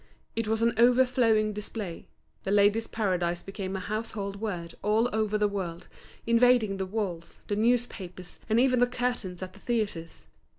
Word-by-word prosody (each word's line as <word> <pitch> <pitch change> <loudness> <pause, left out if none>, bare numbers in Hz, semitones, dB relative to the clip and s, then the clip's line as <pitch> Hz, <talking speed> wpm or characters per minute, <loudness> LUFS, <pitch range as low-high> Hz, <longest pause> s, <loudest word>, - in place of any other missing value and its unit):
It 230 -1 -1
was 220 +1 +1
an 235 - +3
overflowing 240 -3 +4
display; 205 -4 -5 0.3
The - - -5
Ladies' 205 +2 +3
Paradise 175 -5 -1
became 195 -1 -5
a - - -2
household 205 -1 -4
word 175 -6 -4
all 215 +3 +2
over 215 -1 +1
the 210 0 +2
world, 180 -4 -5 0.4
invading 235 -3 +4
the 190 -1 -3
walls, 185 -5 -4
the 205 - +1
newspapers, 210 -6 -1
and 220 +2 +4
even 255 -1 +4
the 245 - +5
curtains 245 -7 -2
at 185 - -7
the 205 - -15
theatres. 205 -8 -3
210 Hz, 160 wpm, -28 LUFS, 190-230 Hz, 0.4 s, the